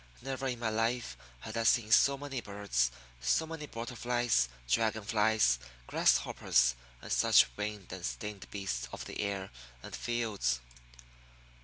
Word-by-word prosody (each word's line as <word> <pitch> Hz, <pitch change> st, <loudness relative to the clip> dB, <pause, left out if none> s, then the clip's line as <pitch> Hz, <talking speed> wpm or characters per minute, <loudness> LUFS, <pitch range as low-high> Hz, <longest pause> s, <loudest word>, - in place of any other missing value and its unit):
Never 135 Hz, 0 st, -3 dB
in 125 Hz, -2 st, -2 dB
my 115 Hz, -2 st, -1 dB
life 115 Hz, +2 st, -1 dB, 0.3 s
had -, -, -7 dB
I 115 Hz, -, +1 dB
seen 115 Hz, -1 st, +3 dB
so 140 Hz, +5 st, +6 dB
many 135 Hz, -3 st, -5 dB
birds, 100 Hz, -, 0 dB, 0.3 s
so 65 Hz, -, +2 dB
many 160 Hz, -2 st, -6 dB
butter 115 Hz, 0 st, -6 dB
flies, 120 Hz, -, +1 dB, 0.2 s
dragon 110 Hz, -, +1 dB
flies, 105 Hz, -, +3 dB, 0.3 s
grasshoppers, 60 Hz, -, +3 dB, 0.3 s
and -, -, -7 dB
such -, -, +5 dB
winged 105 Hz, -3 st, -5 dB
and 95 Hz, -1 st, -7 dB
stinged 105 Hz, 0 st, -5 dB
beasts 80 Hz, -13 st, -3 dB
of -, -, -7 dB
the -, -, -7 dB
air 100 Hz, -2 st, -3 dB, 0.3 s
and -, -, -7 dB
fields. 110 Hz, -, -1 dB
110 Hz, 145 wpm, -32 LUFS, 95-120 Hz, 0.3 s, so